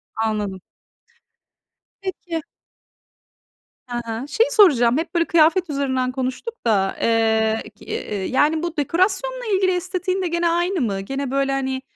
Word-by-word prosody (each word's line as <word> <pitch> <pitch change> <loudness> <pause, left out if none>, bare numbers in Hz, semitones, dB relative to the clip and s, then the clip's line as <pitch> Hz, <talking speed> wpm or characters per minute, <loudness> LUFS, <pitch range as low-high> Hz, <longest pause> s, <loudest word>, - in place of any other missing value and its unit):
Anladım. 210 -4 -2 1.4
Peki. 350 -3 -4 1.5
Hı 240 - -3
hı. 230 +4 -4
Şeyi 460 - +2
soracağım. 275 - +5
Hep 330 +3 -3
böyle 335 -1 +3
kıyafet 335 +2 +3
üzerinden 260 -3 -1
konuştuk 260 - -3
da. 195 -3 +2
Eee, 220 -1 +2
ki - - -16
eee, 200 -2 -4
yani 305 - +2
bu 345 -1 -4
dekorasyonla 380 - 0
ilgili 375 -1 +2
estetiğin 370 +1 -2
de 365 - 0
gene 340 0 +1
aynı 345 0 0
mı? 200 -5 -1
Gene 270 +5 -4
böyle, 275 0 +1
hani, 265 -1 -1
285 Hz, 135 wpm, -21 LUFS, 235-360 Hz, 1.5 s, soracağım